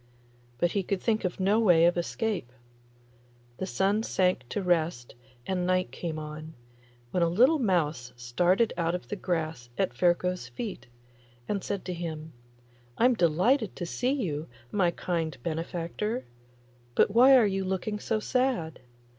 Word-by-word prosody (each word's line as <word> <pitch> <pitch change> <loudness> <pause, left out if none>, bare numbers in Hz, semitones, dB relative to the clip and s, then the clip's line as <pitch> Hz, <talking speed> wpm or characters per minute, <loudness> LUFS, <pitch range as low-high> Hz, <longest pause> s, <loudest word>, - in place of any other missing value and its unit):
But 175 +5 +1
he 200 - 0
could 190 +1 -2
think 220 -1 0
of 180 - -3
no 200 +4 +3
way 175 -7 +5
of 175 - +4
escape. 175 - -2 1.1
The 190 - -3
sun 200 +3 +1
sank 180 - 0
to 200 - -2
rest 165 -8 0 0.3
and 185 -1 -1
night 185 0 +1
came 165 -3 -4
on, 155 +1 -7 0.6
when 180 - 0
a 170 - +3
little 255 - +4
mouse 160 - 0
started 175 - +1
out 170 0 0
of 180 - -7
the - - -2
grass 160 -10 -3
at - - 0
Ferko's 180 +5 +1
feet, 205 - -6 0.6
and 200 -2 -2
said 200 -2 -3
to 185 - -3
him, 160 -2 -6 0.6
'I'm 250 +2 +5
delighted 195 - +2
to 175 - -4
see 250 +9 0
you, 165 - -2 0.2
my 190 -4 +2
kind 165 -3 -2
benefactor; 170 +8 -3 0.7
but - - +4
why 255 +5 +7
are 235 - +5
you 195 -1 0
looking 190 +3 -2
so 220 +1 -1
sad? 250 -9 0
180 Hz, 155 wpm, -28 LUFS, 165-210 Hz, 1.1 s, why